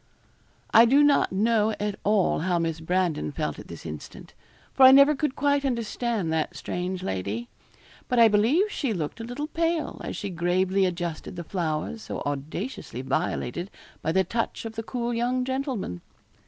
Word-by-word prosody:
I 230 Hz, -, +9 dB
do 275 Hz, +5 st, +5 dB
not 290 Hz, -1 st, +4 dB
know 215 Hz, +2 st, +2 dB
at 210 Hz, 0 st, -1 dB
all 205 Hz, -2 st, +2 dB
how 175 Hz, +2 st, 0 dB
Miss 165 Hz, -1 st, -1 dB
Brandon 165 Hz, -, 0 dB
felt -, -, -3 dB
at -, -, -11 dB
this 85 Hz, -, -10 dB
instant; 75 Hz, -2 st, -9 dB, 0.4 s
for -, -, -2 dB
I 260 Hz, 0 st, +11 dB
never 280 Hz, +2 st, +7 dB
could 285 Hz, -1 st, -1 dB
quite 285 Hz, 0 st, +2 dB
understand 235 Hz, -, -1 dB
that 160 Hz, -1 st, -1 dB
strange 180 Hz, +1 st, -4 dB
lady. 100 Hz, -, -3 dB, 0.6 s
But 250 Hz, -, 0 dB
I 230 Hz, -1 st, +8 dB
believe 245 Hz, -, +3 dB
she 270 Hz, -, -1 dB
looked 165 Hz, +2 st, -4 dB
a -, -, -5 dB
little 245 Hz, +6 st, -4 dB
pale 330 Hz, 0 st, -1 dB
as -, -, -5 dB
she 200 Hz, -2 st, -4 dB
gravely 185 Hz, +2 st, +1 dB
adjusted 175 Hz, -1 st, -4 dB
the 170 Hz, -, -5 dB
flowers 170 Hz, +5 st, -3 dB
so -, -, -6 dB
audaciously 145 Hz, -, -4 dB
violated 135 Hz, +5 st, -2 dB, 0.3 s
by 160 Hz, -, 0 dB
the 190 Hz, +2 st, +3 dB
touch 230 Hz, +5 st, -3 dB
of 225 Hz, -, -5 dB
the 225 Hz, -, -4 dB
cool 240 Hz, +1 st, -3 dB
young 250 Hz, +2 st, 0 dB
gentleman. 260 Hz, -, -3 dB
205 Hz, 170 wpm, -26 LUFS, 170-250 Hz, 0.6 s, I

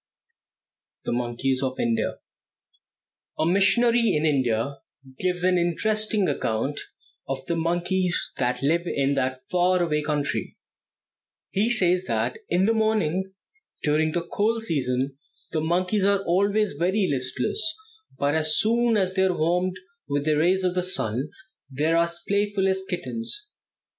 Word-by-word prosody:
THE -, -, -1 dB
MONKEYS 125 Hz, +2 st, -1 dB
OF 130 Hz, -1 st, -2 dB
INDIA. 115 Hz, -2 st, 0 dB, 1.2 s
A 155 Hz, -, +1 dB
missionary 230 Hz, +6 st, +3 dB
in 150 Hz, +1 st, +1 dB
India 130 Hz, -2 st, +1 dB, 0.4 s
gives 180 Hz, -1 st, -1 dB
an 180 Hz, -1 st, +3 dB
interesting 210 Hz, +4 st, +1 dB
account 115 Hz, +6 st, -1 dB, 0.5 s
of 135 Hz, -1 st, -3 dB
the 170 Hz, -, -1 dB
monkeys 175 Hz, +2 st, 0 dB
that 125 Hz, +1 st, 0 dB
live 165 Hz, +5 st, +2 dB
in 140 Hz, -2 st, +1 dB
that 130 Hz, -1 st, -1 dB
far 180 Hz, 0 st, +3 dB
away 150 Hz, -3 st, 0 dB
country. 150 Hz, -1 st, -2 dB, 0.9 s
He 210 Hz, +4 st, +1 dB
says 185 Hz, -5 st, +2 dB
that 115 Hz, 0 st, -1 dB
in 180 Hz, +2 st, +2 dB
the 225 Hz, -, +3 dB
morning, 190 Hz, -5 st, 0 dB, 0.5 s
during 155 Hz, +1 st, +2 dB
the 170 Hz, -1 st, -1 dB
cold 225 Hz, +4 st, 0 dB
season, 135 Hz, -, -1 dB, 0.3 s
the 155 Hz, -, -1 dB
monkeys 180 Hz, +5 st, +1 dB
are 200 Hz, -1 st, +2 dB
always 200 Hz, +2 st, +2 dB
very 185 Hz, +6 st, +1 dB
listless, 130 Hz, -, 0 dB, 0.6 s
but 140 Hz, +1 st, +1 dB
as 155 Hz, -1 st, +2 dB
soon 230 Hz, +1 st, +3 dB
as 190 Hz, -2 st, +1 dB
they 190 Hz, 0 st, +2 dB
are 185 Hz, -2 st, 0 dB
warmed 180 Hz, +3 st, +1 dB, 0.3 s
with 145 Hz, 0 st, -1 dB
the 155 Hz, -, +3 dB
rays 180 Hz, +5 st, +2 dB
of 180 Hz, -1 st, +1 dB
the 180 Hz, -, 0 dB
sun, 135 Hz, -, -3 dB, 0.4 s
they 140 Hz, +3 st, -2 dB
are 165 Hz, -, +3 dB
as 170 Hz, 0 st, -10 dB
playful 200 Hz, -1 st, +1 dB
as 190 Hz, 0 st, 0 dB
kittens. 230 Hz, -, -2 dB
175 Hz, 145 wpm, -25 LUFS, 140-195 Hz, 1.2 s, missionary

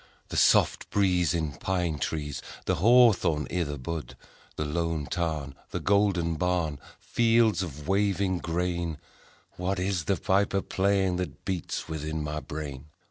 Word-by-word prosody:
The -, -, -5 dB
soft -, -, +4 dB
breeze 90 Hz, -4 st, +2 dB
In 80 Hz, -3 st, -1 dB
pine 90 Hz, -5 st, -1 dB
trees, 75 Hz, -3 st, -3 dB, 0.2 s
The -, -, +1 dB
hawthorn 95 Hz, -, +5 dB
i' 90 Hz, -, 0 dB
the 75 Hz, -3 st, -3 dB
bud; 80 Hz, +4 st, -5 dB, 0.4 s
The 75 Hz, -, -2 dB
lone 80 Hz, 0 st, -1 dB
tarn, 75 Hz, -4 st, -2 dB, 0.2 s
The -, -, -3 dB
golden 95 Hz, -5 st, +2 dB
barn, 85 Hz, -4 st, 0 dB, 0.2 s
Fields 115 Hz, -4 st, +3 dB
of 75 Hz, -4 st, -6 dB
waving 95 Hz, -2 st, +1 dB
grain 85 Hz, -1 st, -2 dB
â€" 75 Hz, -, -27 dB
What 95 Hz, +2 st, -1 dB
is 90 Hz, -3 st, -1 dB
the 100 Hz, -, +2 dB
piper 100 Hz, +2 st, +1 dB
playing 95 Hz, -1 st, +1 dB
That 90 Hz, 0 st, -5 dB
beats 95 Hz, -4 st, -3 dB
within 80 Hz, 0 st, -3 dB
my 75 Hz, 0 st, -3 dB
brain 75 Hz, -2 st, -7 dB
85 Hz, 145 wpm, -28 LUFS, 75-95 Hz, 0.4 s, hawthorn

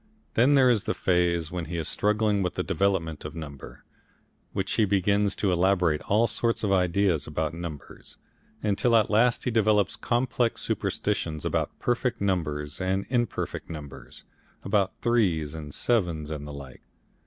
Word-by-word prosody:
Then 130 Hz, +5 st, +4 dB
there 130 Hz, -2 st, +6 dB
is 110 Hz, -4 st, +1 dB
the -, -, -1 dB
phase 85 Hz, -3 st, +1 dB
when 90 Hz, -2 st, -3 dB
he 85 Hz, +2 st, -5 dB
is 80 Hz, -, -2 dB
struggling 105 Hz, -1 st, +2 dB
with 90 Hz, -, -2 dB
the -, -, -1 dB
development 85 Hz, -3 st, 0 dB
of 75 Hz, +1 st, -7 dB
number, 70 Hz, -4 st, -9 dB, 0.7 s
when 95 Hz, -1 st, -2 dB
he 110 Hz, -, +1 dB
begins 100 Hz, 0 st, +2 dB
to 100 Hz, -, 0 dB
elaborate 90 Hz, -3 st, +2 dB
all 110 Hz, +3 st, +4 dB
sorts 115 Hz, 0 st, 0 dB
of 100 Hz, -, +1 dB
ideas 90 Hz, -2 st, +2 dB
about 80 Hz, +1 st, -2 dB
numbers, 80 Hz, -3 st, -9 dB, 0.5 s
until 105 Hz, +3 st, +2 dB
at 110 Hz, -2 st, +3 dB
last 115 Hz, +3 st, +3 dB
he 125 Hz, -, -1 dB
develops 105 Hz, -3 st, +2 dB
complex 120 Hz, -1 st, 0 dB
superstitions 80 Hz, -2 st, -2 dB
about -, -, -1 dB
perfect 120 Hz, 0 st, -1 dB
numbers 75 Hz, -6 st, -2 dB
and 95 Hz, +1 st, 0 dB
imperfect 120 Hz, -7 st, -2 dB
numbers, 70 Hz, -5 st, -9 dB, 0.4 s
about 100 Hz, -1 st, +1 dB
threes 90 Hz, -11 st, +1 dB
and 75 Hz, -2 st, -7 dB
sevens 85 Hz, -, 0 dB
and 75 Hz, -1 st, -5 dB
the 75 Hz, -, -7 dB
like. 70 Hz, -3 st, -10 dB
95 Hz, 155 wpm, -26 LUFS, 80-110 Hz, 0.7 s, there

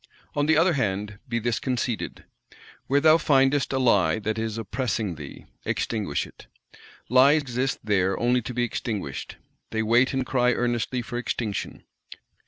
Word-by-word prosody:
On 145 Hz, 0 st, 0 dB
the 160 Hz, -1 st, +4 dB
other 170 Hz, +2 st, +4 dB
hand, 105 Hz, -5 st, -2 dB
be 115 Hz, -, 0 dB
this 115 Hz, 0 st, -1 dB
conceded: 125 Hz, -3 st, -3 dB, 0.6 s
Where 140 Hz, +2 st, +3 dB
thou 155 Hz, +2 st, +6 dB
findest 135 Hz, -2 st, +3 dB
a 135 Hz, -, 0 dB
Lie 100 Hz, -11 st, +3 dB
that 110 Hz, +1 st, -2 dB
is 110 Hz, -1 st, -3 dB
oppressing 115 Hz, -2 st, -2 dB
thee, 75 Hz, -3 st, -10 dB, 0.2 s
extinguish 105 Hz, -10 st, -1 dB
it. -, -, -16 dB, 0.6 s
Lies 135 Hz, +5 st, +6 dB
exist 130 Hz, 0 st, -1 dB
there 95 Hz, -3 st, +1 dB
only 125 Hz, +1 st, +2 dB
to 125 Hz, -, -6 dB
be 120 Hz, -, +1 dB
extinguished; 105 Hz, -, -4 dB, 0.3 s
they 110 Hz, 0 st, -1 dB
wait 120 Hz, +4 st, +3 dB
and 130 Hz, -1 st, -1 dB
cry 125 Hz, -1 st, +2 dB
earnestly 120 Hz, +1 st, -1 dB
for 120 Hz, +1 st, -4 dB
extinction. 110 Hz, -4 st, -4 dB
120 Hz, 155 wpm, -25 LUFS, 110-130 Hz, 0.6 s, thou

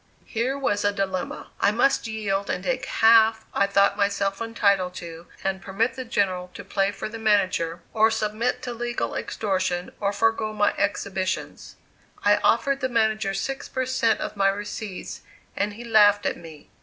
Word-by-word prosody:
Here 250 Hz, +4 st, -1 dB
was 205 Hz, -7 st, 0 dB
a 205 Hz, -, +3 dB
dilemma! 190 Hz, -2 st, -3 dB
I -, -, +4 dB
must 240 Hz, +3 st, +2 dB
yield 200 Hz, -3 st, -2 dB
and 180 Hz, -, -2 dB
take 260 Hz, +2 st, -2 dB
half 225 Hz, 0 st, +5 dB
I 200 Hz, -, +2 dB
thought 200 Hz, 0 st, +3 dB
myself 200 Hz, 0 st, 0 dB
entitled 200 Hz, -5 st, +1 dB
to 170 Hz, 0 st, -9 dB, 0.2 s
and 190 Hz, 0 st, -1 dB
permit 200 Hz, +6 st, -1 dB
the 260 Hz, -, -5 dB
General 185 Hz, -5 st, -1 dB
to -, -, -8 dB
play 195 Hz, 0 st, 0 dB
for -, -, -5 dB
the 225 Hz, +1 st, -8 dB
manager, 185 Hz, -6 st, +1 dB
or 220 Hz, 0 st, +4 dB
submit 220 Hz, +2 st, -1 dB
to 245 Hz, -, -4 dB
legal 240 Hz, +1 st, -3 dB
extortion, 185 Hz, -4 st, -2 dB
or 200 Hz, -1 st, 0 dB
forego 220 Hz, +1 st, 0 dB
my 205 Hz, -1 st, +2 dB
exhibitions. 190 Hz, -2 st, -2 dB, 0.5 s
I 205 Hz, 0 st, +5 dB
offered 275 Hz, +4 st, +2 dB
the 260 Hz, -2 st, -1 dB
manager 220 Hz, -4 st, +1 dB
six 270 Hz, +7 st, -4 dB
per 260 Hz, -1 st, -2 dB
cent 235 Hz, -3 st, +1 dB
of 215 Hz, -, -4 dB
my 195 Hz, -1 st, +3 dB
receipts 205 Hz, -1 st, -5 dB, 0.3 s
and 205 Hz, +1 st, -1 dB
he 230 Hz, +3 st, -9 dB
laughed 210 Hz, -3 st, +5 dB
at -, -, 0 dB
me. 160 Hz, -3 st, -13 dB
205 Hz, 170 wpm, -24 LUFS, 195-225 Hz, 0.5 s, half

